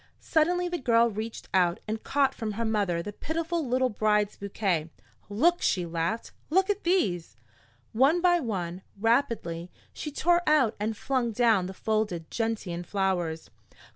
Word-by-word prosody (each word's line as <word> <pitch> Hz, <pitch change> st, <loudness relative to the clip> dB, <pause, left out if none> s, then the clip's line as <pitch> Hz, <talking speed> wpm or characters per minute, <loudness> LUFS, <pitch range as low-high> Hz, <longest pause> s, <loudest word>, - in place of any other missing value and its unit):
Suddenly 355 Hz, +2 st, +1 dB
the 350 Hz, -1 st, -3 dB
girl 235 Hz, -2 st, +3 dB
reached 220 Hz, +2 st, -6 dB
out 180 Hz, -2 st, +3 dB
and 220 Hz, +1 st, -3 dB
caught 275 Hz, -1 st, +2 dB
from 220 Hz, -5 st, -4 dB
her 230 Hz, +3 st, -2 dB
mother 200 Hz, -6 st, 0 dB
the 205 Hz, -, -6 dB
pitiful 330 Hz, +5 st, -2 dB
little 255 Hz, -1 st, +1 dB
bride's 210 Hz, -1 st, +1 dB
bouquet. 190 Hz, -5 st, -1 dB, 0.4 s
"Look!" 330 Hz, +13 st, +2 dB
she 180 Hz, -2 st, +1 dB
laughed. 170 Hz, +6 st, -2 dB, 0.2 s
"Look 380 Hz, +5 st, +3 dB
at 410 Hz, 0 st, -4 dB
these!" 185 Hz, -, 0 dB, 0.6 s
One 275 Hz, +9 st, +4 dB
by 350 Hz, 0 st, +4 dB
one, 185 Hz, -, -3 dB, 0.2 s
rapidly, 215 Hz, -7 st, 0 dB, 0.2 s
she 300 Hz, -, -5 dB
tore 345 Hz, +4 st, +2 dB
out 270 Hz, -8 st, +4 dB
and 215 Hz, +1 st, -2 dB
flung 255 Hz, -3 st, -1 dB
down 220 Hz, -5 st, +3 dB
the 190 Hz, -, -8 dB
folded 210 Hz, -7 st, -2 dB
gentian 210 Hz, -7 st, -2 dB
flowers. 175 Hz, -4 st, -2 dB
220 Hz, 150 wpm, -28 LUFS, 190-280 Hz, 0.6 s, One